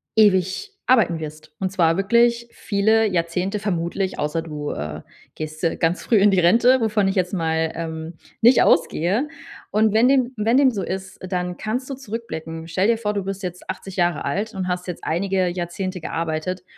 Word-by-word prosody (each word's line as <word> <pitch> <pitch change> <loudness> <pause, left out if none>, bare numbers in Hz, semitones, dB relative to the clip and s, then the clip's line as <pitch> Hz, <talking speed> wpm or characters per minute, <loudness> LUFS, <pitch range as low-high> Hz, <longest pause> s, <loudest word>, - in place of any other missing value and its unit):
ewig 205 - +3
arbeiten 220 -10 +3
wirst. 155 0 -9
Und 190 -1 -1
zwar 165 -3 +3
wirklich 235 +4 +2
viele 220 +2 +2
Jahrzehnte 180 +2 -1
vermutlich 185 -1 -2
außer 150 +2 -1
du, 150 -2 -5
äh, 75 +1 -5 0.3
gehst, 155 +1 -7
äh, 165 - +1
ganz 165 +2 0
früh 235 - +2
in 200 +1 +5
die 190 - +3
Rente, 235 +8 +5
wovon 215 -3 +2
ich 190 - +1
jetzt 180 -1 0
mal, 160 -2 0
ähm, 160 0 -5 0.3
nicht 240 +2 +6
ausgehe. 180 - +2 0.4
Und 215 0 +3
wenn 225 +3 +5
dem 260 -2 +2
wenn 225 +4 +2
dem 275 -2 +5
so 205 -5 -3
ist, 190 +1 -5
dann 180 -1 -3
kannst 245 +4 -3
du - - -3
zurückblicken. 200 -10 -6
Stell 185 +5 +1
dir 230 - +3
vor, 210 -2 -2
du 200 -2 -2
bist 195 0 -5
jetzt 180 0 -6
80 195 -1 -6
Jahre 175 -3 +1
alt 200 +10 -2
und 185 -1 -3
hast 180 0 -3
jetzt 175 - -6
einige 185 +2 0
Jahrzehnte 180 +1 -4
gearbeitet. 165 +3 -3
185 Hz, 185 wpm, -22 LUFS, 165-215 Hz, 0.4 s, nicht